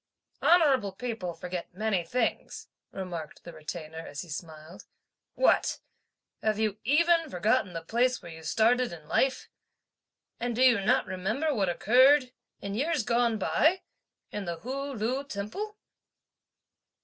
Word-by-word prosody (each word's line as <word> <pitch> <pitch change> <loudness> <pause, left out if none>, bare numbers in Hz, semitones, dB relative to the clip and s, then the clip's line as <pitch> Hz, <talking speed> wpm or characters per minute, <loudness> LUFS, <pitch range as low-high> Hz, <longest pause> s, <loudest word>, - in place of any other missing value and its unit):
"Honourable 275 - +4
people 205 -6 -4
forget 180 -1 -6
many 205 -3 0
things," 230 +7 -2 0.2
remarked 175 -5 -6
the 170 - -10
Retainer, 155 0 -7
as 150 -1 -7
he 175 - -14
smiled. 160 +3 -8 0.5
"What! - - +3 0.6
Have 215 -1 +1
you 215 -1 -1
even 330 +5 +3
forgotten 210 0 +1
the 165 -1 -5
place 245 +7 +1
where 170 - -11
you 160 0 -10
started 230 +9 +2
in 160 -3 -10
life? 265 - +1 0.9
and 240 0 -2
do 255 - +3
you 240 -5 +5
not 250 +6 +2
remember 215 +12 -1
what 200 -7 +1
occurred, 255 +8 +5 0.3
in 200 - -4
years 290 +4 0
gone 235 0 +2
by, 320 - +2 0.5
in 205 -1 -4
the 170 -1 -5
Hu 275 +3 -4
Lu 250 +3 -2
Temple?" 280 - -5
220 Hz, 135 wpm, -28 LUFS, 180-255 Hz, 0.9 s, you